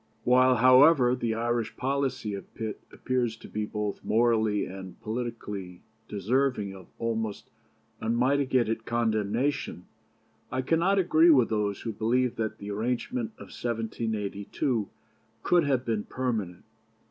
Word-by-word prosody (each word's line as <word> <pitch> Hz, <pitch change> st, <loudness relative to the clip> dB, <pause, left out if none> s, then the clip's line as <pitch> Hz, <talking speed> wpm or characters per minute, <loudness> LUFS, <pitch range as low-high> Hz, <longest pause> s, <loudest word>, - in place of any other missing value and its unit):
"While, 130 Hz, +1 st, +5 dB
however, 130 Hz, +2 st, +6 dB
the 115 Hz, -3 st, -1 dB
Irish 120 Hz, 0 st, -1 dB
policy 130 Hz, -5 st, -1 dB
of 100 Hz, -, -8 dB
Pitt 110 Hz, -2 st, -5 dB
appears 125 Hz, -3 st, -1 dB
to -, -, -12 dB
be 105 Hz, 0 st, -3 dB
both 105 Hz, -1 st, -4 dB
morally 110 Hz, -2 st, +2 dB
and 95 Hz, 0 st, -9 dB
politically 110 Hz, -6 st, -5 dB, 0.2 s
deserving 105 Hz, 0 st, 0 dB
of 95 Hz, -2 st, -13 dB
almost 110 Hz, -2 st, -3 dB, 0.5 s
unmitigated 120 Hz, -1 st, +1 dB
condemnation, 115 Hz, +3 st, -1 dB, 0.7 s
I 130 Hz, 0 st, -1 dB
cannot 170 Hz, +8 st, +2 dB
agree 170 Hz, -3 st, +5 dB
with 130 Hz, -7 st, +5 dB
those 105 Hz, -2 st, -1 dB
who 115 Hz, -, -4 dB
believe 120 Hz, +4 st, +1 dB
that 110 Hz, -1 st, -2 dB
the 100 Hz, 0 st, -6 dB
arrangement 125 Hz, -, -2 dB
of -, -, -12 dB
1782 110 Hz, -1 st, -2 dB, 0.5 s
could 175 Hz, -3 st, +3 dB
have 130 Hz, -3 st, +1 dB
been 110 Hz, -3 st, -1 dB
permanent. 110 Hz, -9 st, -3 dB
115 Hz, 125 wpm, -28 LUFS, 105-130 Hz, 0.7 s, however